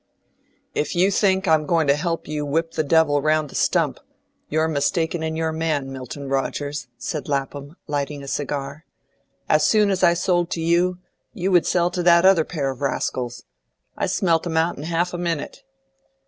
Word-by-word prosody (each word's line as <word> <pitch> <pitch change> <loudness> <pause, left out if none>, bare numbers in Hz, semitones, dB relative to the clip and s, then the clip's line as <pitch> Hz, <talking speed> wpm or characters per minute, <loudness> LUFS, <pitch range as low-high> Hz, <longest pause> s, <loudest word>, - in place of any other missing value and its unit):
"If 150 - -2
you 185 +3 +3
think 190 -1 +2
I'm 155 -2 +3
going 165 -2 +2
to 140 0 +4
help 165 +1 -3
you 150 -1 -3
whip 165 +3 -1
the 155 - -1
devil 150 -1 +3
round 155 -1 +1
the - - -11
stump, - - +1 0.5
you're 160 +1 +1
mistaken 160 +2 0
in 160 0 -2
your 160 0 -1
man, 155 -4 -2
Milton 135 +2 -7
Rogers," 140 0 -2
said 140 +6 -5
Lapham, 140 +2 -3
lighting 145 -1 -3
a - - -9
cigar. 140 +1 -4 0.6
"As 155 0 +3
soon 210 +4 +4
as 190 - -1
I 170 0 +5
sold 175 -1 +1
to - - -4
you, 175 +2 +2 0.4
you 195 -3 -2
would 175 -3 +4
sell 175 0 +2
to 180 - -2
that 170 0 +5
other 190 -4 +6
pair 140 -6 -2
of 130 - -10
rascals. 125 -4 -2 0.5
I - - -1
smelt 170 -3 +1
'em 160 -1 -2
out 165 +2 +2
in 145 - -7
half 175 +2 -1
a 175 - -4
minute." 170 - -3
160 Hz, 185 wpm, -22 LUFS, 145-175 Hz, 0.6 s, other